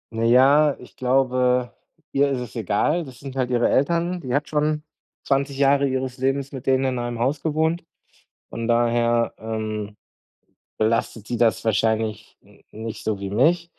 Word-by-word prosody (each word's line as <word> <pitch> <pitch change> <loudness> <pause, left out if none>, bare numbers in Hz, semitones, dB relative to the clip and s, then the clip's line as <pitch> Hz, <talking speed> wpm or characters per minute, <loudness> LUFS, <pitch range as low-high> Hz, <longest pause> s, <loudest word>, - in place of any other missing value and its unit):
Na 115 - -1
ja, 140 +5 +5
ich 125 - -15
glaube, 125 -1 +1 0.4
ihr 140 +1 +2
ist 135 -2 -1
es 125 0 -8
egal. 115 - 0
Das 130 -3 -12
sind 135 -1 -8
halt 130 -2 -1
ihre 120 -1 +2
Eltern, 170 +5 +1
die 125 -3 -4
hat 145 +1 0
schon, 150 0 0 0.4
20 140 0 0
Jahre 140 0 +3
ihres 130 0 -3
Lebens 135 +1 -1
mit 135 -2 -8
denen 130 0 +3
in 130 -2 -1
einem 120 -1 -3
Haus 135 +5 0
gewohnt. 160 +2 0 0.7
Von 115 0 -4
daher, 120 0 +2
ähm, 110 -2 -4 0.8
belastet 110 -1 0
sie 120 - -2
das 115 -1 +2
wahrscheinlich, 110 0 0
n - - -22
nicht 110 +1 -7
so 110 -2 -1
wie 100 -1 -4
mich. 170 +10 +2
130 Hz, 165 wpm, -23 LUFS, 115-140 Hz, 0.8 s, ja